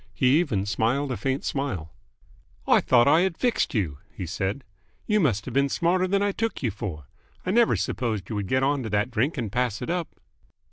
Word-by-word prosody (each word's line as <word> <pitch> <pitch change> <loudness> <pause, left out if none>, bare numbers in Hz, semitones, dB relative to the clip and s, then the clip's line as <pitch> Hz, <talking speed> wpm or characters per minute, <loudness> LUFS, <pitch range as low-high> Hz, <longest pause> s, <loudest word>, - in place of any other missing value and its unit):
He 130 +4 +4
even 110 - 0
smiled 125 +7 0
a - - -1
faint 135 +2 -2
smile. 120 - -3 0.8
"I - - +5
thought 120 -1 +4
I 155 +4 +5
had 185 -3 0
fixed 245 - 0
you, 80 -10 -1
he 95 - -6
said. 95 - -3 0.4
You 210 -1 +2
must 115 - +1
have - - -6
been 140 +1 +2
smarter 180 +3 +1
than 200 +2 +1
I 205 - +2
took 225 -4 -3
you 115 - +1
for. 95 - -6 0.4
I 185 - 0
never 235 +2 +4
supposed 110 -7 -2
you 110 - -4
would 100 -2 -2
get 130 +4 +1
on 140 0 +1
to 115 - -4
that 105 +4 0
drink 130 +7 0
and 115 -6 -3
pass 125 -4 0
it - - -3
up." 175 -2 -1
130 Hz, 215 wpm, -25 LUFS, 105-165 Hz, 0.8 s, I